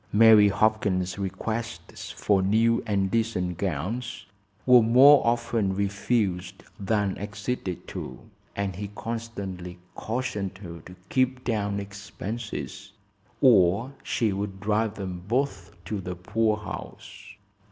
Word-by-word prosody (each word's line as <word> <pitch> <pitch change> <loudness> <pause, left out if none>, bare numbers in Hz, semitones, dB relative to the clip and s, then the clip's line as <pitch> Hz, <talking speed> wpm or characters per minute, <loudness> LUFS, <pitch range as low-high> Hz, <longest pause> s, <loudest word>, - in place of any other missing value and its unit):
Mary 110 -1 +7
Hopkins's 100 -2 +1
requests 110 +4 -4
for 100 -2 +1
new 115 +4 +3
and 100 -2 +1
decent 105 -7 -1
gowns 100 - -3 0.4
were 125 -1 +8
more 130 +6 +7
often 115 -4 +1
refused 100 -2 -1 0.2
than 100 -1 0
acceded 105 -2 -4
to, - - -6 0.4
and 100 -2 -2
he 100 +1 -4
constantly 100 -7 -5 0.2
cautioned 105 -5 -3
her 85 -3 -9
to 90 - -11
keep 130 0 +1
down 100 -4 -1
expenses 100 0 -6 0.5
or 110 -1 +5
she 110 -4 0
would 100 0 -4
drive 105 +1 0
them 95 -3 -5
both 115 -7 -1 0.2
to 105 -3 -3
the 90 0 -5
poor 110 +4 0
house. 105 - -9
105 Hz, 115 wpm, -26 LUFS, 95-115 Hz, 0.5 s, were